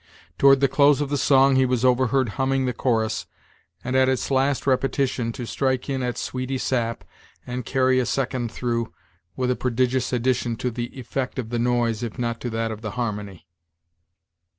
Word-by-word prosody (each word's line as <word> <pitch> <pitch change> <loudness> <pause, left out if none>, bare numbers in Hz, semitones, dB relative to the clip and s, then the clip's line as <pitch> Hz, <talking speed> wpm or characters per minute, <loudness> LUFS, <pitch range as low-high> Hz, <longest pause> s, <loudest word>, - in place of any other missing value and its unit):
Toward 135 -1 +6
the 140 - +5
close 145 +1 +4
of 145 -2 -1
the 145 - 0
song, 135 0 +4
he 130 - +4
was 125 0 0
overheard 130 0 +2
humming 135 +4 0
the 125 - -1
chorus, 110 -3 -1 0.6
and, 130 +1 -2
at 130 0 +4
its 130 +1 -1
last 135 +1 +1
repetition, 130 -2 0
to 120 - -6
strike 130 +2 -1
in 135 -1 -1
at 125 -1 -2
"sweety 130 +1 -3
sap," 115 -3 -1 0.4
and 125 -1 -5
carry 130 -1 +2
a 125 - +1
second 130 -3 -1
through, 115 -1 -2 0.4
with 125 -1 0
a - - +1
prodigious 125 +1 0
addition 125 -1 0
to 125 +2 -2
the 120 +1 -3
"effect" 130 +2 -4
of 120 -4 -4
the 120 0 -2
noise, 120 -2 +1
if 115 -3 -5
not 120 -1 -2
to 125 - -3
that 115 0 -2
of 110 0 -7
the 110 -2 -4
harmony. 105 -7 -4
125 Hz, 185 wpm, -23 LUFS, 115-130 Hz, 0.6 s, Toward